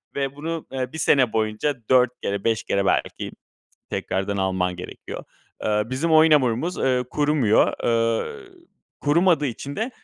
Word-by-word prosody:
ve 140 Hz, 0 st, -2 dB
bunu, 165 Hz, +2 st, -4 dB
eee, 130 Hz, -1 st, -3 dB
1 -, -, -5 dB
sene 135 Hz, -6 st, +3 dB
boyunca 110 Hz, +6 st, 0 dB
4 125 Hz, -1 st, +5 dB
kere, 100 Hz, 0 st, -2 dB
5 115 Hz, -3 st, +1 dB
kere 100 Hz, 0 st, 0 dB
belki -, -, -1 dB, 0.6 s
tekrardan 95 Hz, +2 st, -2 dB
alman 95 Hz, -2 st, 0 dB
gerekiyor. 90 Hz, -, -8 dB, 0.4 s
Eee, 105 Hz, 0 st, +2 dB
bizim 135 Hz, +7 st, -1 dB
oyun 160 Hz, 0 st, +6 dB
hamurumuz, 140 Hz, +5 st, +2 dB
eee, 125 Hz, -1 st, +1 dB
kurumuyor. 145 Hz, -7 st, +3 dB
Eee, 115 Hz, -, 0 dB, 0.6 s
kurumadığı 165 Hz, +1 st, +3 dB
için 140 Hz, +3 st, -6 dB
de, 225 Hz, +4 st, -2 dB
130 Hz, 145 wpm, -23 LUFS, 110-150 Hz, 0.6 s, oyun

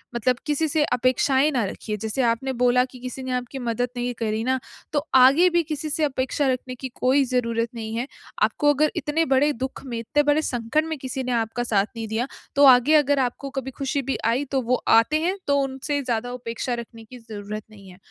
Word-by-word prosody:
मतलब 240 Hz, +1 st, +1 dB
किसी 300 Hz, +2 st, +1 dB
से 300 Hz, 0 st, +1 dB
अपेक्षाएँ 265 Hz, +4 st, +2 dB
ना 250 Hz, -5 st, +1 dB
रखिए। 210 Hz, +2 st, -5 dB
जैसे 220 Hz, +5 st, -2 dB
आपने 235 Hz, +3 st, 0 dB
बोला 250 Hz, 0 st, +3 dB
कि 255 Hz, 0 st, -14 dB
किसी 255 Hz, +1 st, -6 dB
ने 260 Hz, -, -4 dB
आपकी 250 Hz, +2 st, -4 dB
मदद 245 Hz, 0 st, -1 dB
नहीं 245 Hz, 0 st, -2 dB
करी 220 Hz, -1 st, -1 dB
ना, 260 Hz, +2 st, +1 dB, 0.3 s
तो 290 Hz, 0 st, 0 dB
आगे 270 Hz, +8 st, +7 dB
भी 345 Hz, 0 st, +2 dB
किसी 310 Hz, 0 st, -4 dB
से 315 Hz, +1 st, -1 dB
अपेक्षा 270 Hz, 0 st, 0 dB
रखने 255 Hz, 0 st, -2 dB
की 260 Hz, +1 st, -6 dB
कोई 265 Hz, +2 st, +3 dB
ज़रूरत 235 Hz, -2 st, 0 dB
नहीं 220 Hz, -1 st, -5 dB
है। 240 Hz, +3 st, -2 dB, 0.4 s
आपको 290 Hz, 0 st, +3 dB
अगर 300 Hz, +2 st, +2 dB
इतने 320 Hz, +2 st, 0 dB
बड़े 275 Hz, +2 st, +3 dB
दुःख 260 Hz, +2 st, -5 dB
में 240 Hz, -3 st, -4 dB
इतने 290 Hz, +6 st, +1 dB
बड़े 295 Hz, +1 st, +3 dB
संकट 245 Hz, +3 st, -1 dB
में 320 Hz, -1 st, -4 dB
किसी 260 Hz, 0 st, -4 dB
ने 250 Hz, -, -3 dB
आपका 230 Hz, 0 st, -1 dB
साथ 205 Hz, -4 st, +2 dB
नहीं 225 Hz, -1 st, -5 dB
दिया 225 Hz, +4 st, -2 dB, 0.3 s
तो 285 Hz, -, +5 dB
आगे 260 Hz, +3 st, +7 dB
अगर 285 Hz, -2 st, +3 dB
आपको 260 Hz, +2 st, -2 dB
कभी 265 Hz, 0 st, -6 dB
खुशी 275 Hz, +2 st, -2 dB
भी 270 Hz, 0 st, -2 dB
आई 235 Hz, +5 st, +2 dB
तो 270 Hz, -1 st, +1 dB
वो 250 Hz, +1 st, +1 dB
आते 230 Hz, +7 st, +4 dB
हैं 365 Hz, +4 st, 0 dB
तो 280 Hz, 0 st, +3 dB
उनसे 275 Hz, +2 st, -2 dB
ज़्यादा 245 Hz, -1 st, -2 dB
उपेक्षा 240 Hz, 0 st, -4 dB
रखने 235 Hz, -1 st, -7 dB
की 250 Hz, +3 st, -12 dB
ज़रूरत 215 Hz, -2 st, -7 dB
नहीं 200 Hz, -3 st, -14 dB
है। 180 Hz, -, -14 dB
255 Hz, 220 wpm, -24 LUFS, 235-280 Hz, 0.4 s, आगे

